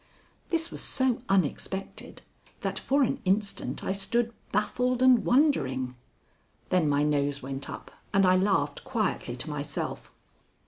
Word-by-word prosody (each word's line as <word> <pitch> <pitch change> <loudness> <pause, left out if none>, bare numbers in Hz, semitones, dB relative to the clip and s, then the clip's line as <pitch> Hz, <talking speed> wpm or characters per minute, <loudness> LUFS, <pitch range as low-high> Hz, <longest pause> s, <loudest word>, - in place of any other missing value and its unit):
This 330 0 0
was - - -4
so 260 -3 +2
unexpected 190 +1 -2 0.4
that - - -2
for 280 +1 +2
an 250 - 0
instant 200 +2 -1
I - - -1
stood 230 +4 0 0.2
baffled 250 +5 +1
and 255 -2 +6
wondering. 190 - +2 0.8
Then 175 -5 +2
my 145 0 +2
nose 145 -2 0
went 135 +1 -5
up, - - -8 0.2
and 195 -1 +4
I 185 0 +5
laughed 185 -6 +1
quietly 215 - -2
to 130 +5 -3
myself. 145 -1 -5
195 Hz, 135 wpm, -28 LUFS, -, 0.8 s, and